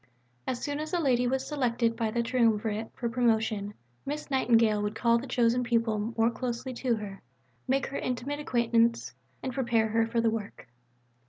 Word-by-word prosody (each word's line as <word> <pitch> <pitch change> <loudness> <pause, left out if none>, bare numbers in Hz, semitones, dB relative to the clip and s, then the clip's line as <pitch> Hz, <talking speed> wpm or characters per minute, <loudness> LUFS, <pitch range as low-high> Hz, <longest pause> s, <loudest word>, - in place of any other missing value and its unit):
As 250 - -1
soon 290 0 -3
as 310 +2 -5
a 350 - +2
lady 250 -5 +2
was 265 +1 0
selected 240 -5 0
by 225 -1 -1
the 235 +2 0
triumvirate 225 -3 +1
for 240 - -2
promotion, 220 -3 0 0.3
Miss 295 +1 -5
Nightingale 230 -5 +3
would 210 +1 -2
call 235 0 +3
the 265 - -7
chosen 245 0 +2
pupil 230 -2 0
more 225 +1 +3
closely 250 +1 -4
to 245 -1 0
her, 205 -3 -7 0.5
make 270 +1 +1
her 275 - -4
intimate 255 +4 -3
acquaintance 235 - +1 0.3
and 260 - -3
prepare 235 -3 +1
her 225 +1 +2
for 230 +1 0
the 230 -1 +2
work. 210 -10 -6
235 Hz, 175 wpm, -29 LUFS, 225-255 Hz, 0.5 s, Nightingale